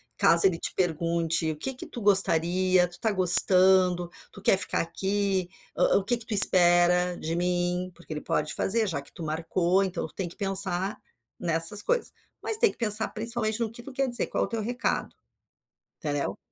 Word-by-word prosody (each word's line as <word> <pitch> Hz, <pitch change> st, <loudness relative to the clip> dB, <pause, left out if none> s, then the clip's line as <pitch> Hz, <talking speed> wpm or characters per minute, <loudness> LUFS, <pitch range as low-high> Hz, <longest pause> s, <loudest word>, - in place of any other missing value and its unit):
caso 170 Hz, +2 st, +4 dB
ele 175 Hz, -3 st, 0 dB
te -, -, -4 dB
pergunte: 165 Hz, -2 st, -3 dB
"O -, -, -8 dB
que 265 Hz, -, -6 dB
que 250 Hz, -, -12 dB
tu 240 Hz, -, -11 dB
gostaria? 185 Hz, -2 st, +2 dB
Tu -, -, -22 dB
está 215 Hz, +5 st, -3 dB
gostando? 185 Hz, -1 st, +5 dB, 0.2 s
Tu 200 Hz, -, -16 dB
quer 195 Hz, -, +1 dB
ficar -, -, -3 dB
aqui? 190 Hz, +2 st, -4 dB, 0.3 s
hã -, -, -2 dB
hã, -, -, +3 dB
o 195 Hz, -, -3 dB
que 240 Hz, +4 st, -2 dB
que 230 Hz, -, -8 dB
tu 220 Hz, -, -5 dB
espera 180 Hz, -2 st, +4 dB
de 165 Hz, +1 st, -6 dB
mim?". 180 Hz, +1 st, -4 dB
Porque 175 Hz, -2 st, -12 dB
ele 150 Hz, -, -8 dB
pode 150 Hz, 0 st, -4 dB
fazer, 220 Hz, +1 st, -1 dB
já 140 Hz, -6 st, -6 dB
que 140 Hz, -, -13 dB
tu 165 Hz, -, -12 dB
marcou 170 Hz, +4 st, -3 dB
então, 190 Hz, 0 st, -6 dB
tu -, -, -19 dB
tem 180 Hz, -3 st, -7 dB
que -, -, -12 dB
pensar 195 Hz, -1 st, +1 dB, 0.4 s
nessas 165 Hz, +4 st, +3 dB
coisas. -, -, -4 dB, 0.3 s
Mas 440 Hz, -, +5 dB
tem 450 Hz, -2 st, +1 dB
que -, -, -24 dB
pensar, 220 Hz, -1 st, +6 dB
principalmente, 220 Hz, 0 st, -5 dB
no 225 Hz, -2 st, -5 dB
que 235 Hz, -, -13 dB
tu 275 Hz, -, -12 dB
quer 270 Hz, +1 st, -4 dB
dizer, 240 Hz, -1 st, +1 dB
qual -, -, -4 dB
o -, -, -10 dB
teu 230 Hz, -2 st, -6 dB
recado? 245 Hz, +3 st, -5 dB, 0.8 s
Entendeu? 145 Hz, -2 st, -5 dB
185 Hz, 200 wpm, -24 LUFS, 175-210 Hz, 0.8 s, pensar